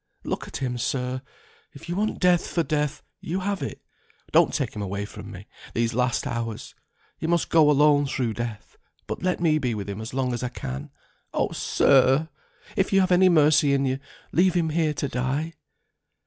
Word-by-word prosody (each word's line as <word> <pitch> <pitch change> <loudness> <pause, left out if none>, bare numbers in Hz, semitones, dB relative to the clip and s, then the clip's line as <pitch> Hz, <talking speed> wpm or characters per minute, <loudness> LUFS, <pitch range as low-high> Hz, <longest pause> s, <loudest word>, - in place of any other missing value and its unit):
Look - - -3
at - - -6
him, 125 -2 -3
sir. 130 +1 -2 0.5
If 140 - -12
you 175 - -3
want 215 +3 -1
Death 180 -2 +3
for 170 - 0
Death, 150 -1 -1 0.2
you 185 +4 -3
have 200 +1 -2
it. - - -5 0.5
Don't - - +5
take - - -2
him 105 - -4
away 100 +1 -3
from - - -10
me - - -10 0.3
these 115 0 +1
last 125 0 0
hours. 115 -2 -4 0.5
He 160 - -2
must 170 0 +1
go 155 -3 +6
alone 145 0 +4
through 125 -4 -1
Death, 115 -2 -6 0.3
but - - -5
let 180 0 0
me 155 -3 +3
be 125 -5 -1
with 100 -2 -5
him 100 +1 -5
as 110 - -6
long 130 -1 -1
as 120 - -3
I 125 - -2
can. 65 - -6 0.5
Oh, - - +1
sir! 135 +3 +3 0.5
if - - +1
you 195 - +5
have 185 -1 +2
any 185 +1 +6
mercy 150 -3 +5
in 135 0 +1
you, 130 0 -1 0.3
leave 180 +1 +3
him 165 -2 +2
here 155 -1 +1
to 140 - -2
die." 135 +6 -2
140 Hz, 195 wpm, -25 LUFS, 120-165 Hz, 0.5 s, go